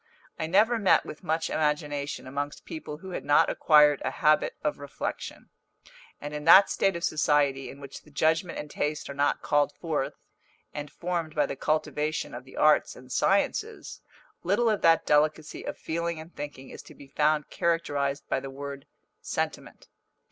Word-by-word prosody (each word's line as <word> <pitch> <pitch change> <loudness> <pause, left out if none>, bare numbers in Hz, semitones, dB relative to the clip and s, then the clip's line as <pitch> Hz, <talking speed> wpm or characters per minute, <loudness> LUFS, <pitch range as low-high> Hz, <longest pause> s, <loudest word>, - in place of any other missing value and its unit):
I 160 - -2
never 220 +7 +3
met 200 - +4
with 155 - -9
much 160 -1 0
imagination 150 -2 -1
amongst 145 +2 -5
people 315 - -7
who 190 +4 -10
had - - -4
not 145 +1 +4
acquired 150 -2 +5
a - - 0
habit 155 +2 +2
of 150 - -1
reflection; 145 -1 -6 0.7
and 145 +1 -7
in 150 0 -5
that 190 +4 +8
state 195 -2 +1
of 170 - -5
society 145 -3 +1
in 140 - -11
which 140 -1 -10
the - - -20
judgment 160 +4 0
and 150 - -5
taste 150 0 -3
are - - -6
not 145 +1 0
called 145 -1 +2
forth, 155 -5 -3 0.6
and 145 0 -6
formed 170 -3 -3
by 150 -1 +3
the - - -5
cultivation 155 +1 -1
of 125 +1 -8
the 130 - -14
arts 155 0 +3
and 125 0 -14
sciences, 415 - 0 0.4
little 235 -2 +2
of 210 - -1
that 165 -1 +4
delicacy 150 +1 +1
of - - -4
feeling 170 0 -3
and 160 +2 -12
thinking 145 -2 -8
is - - -9
to - - -15
be 140 - -13
found 150 +1 0
characterised 145 -4 -1
by - - 0
the 135 0 -7
word 140 0 -8 0.3
sentiment. - - -4
150 Hz, 175 wpm, -27 LUFS, 145-165 Hz, 0.7 s, that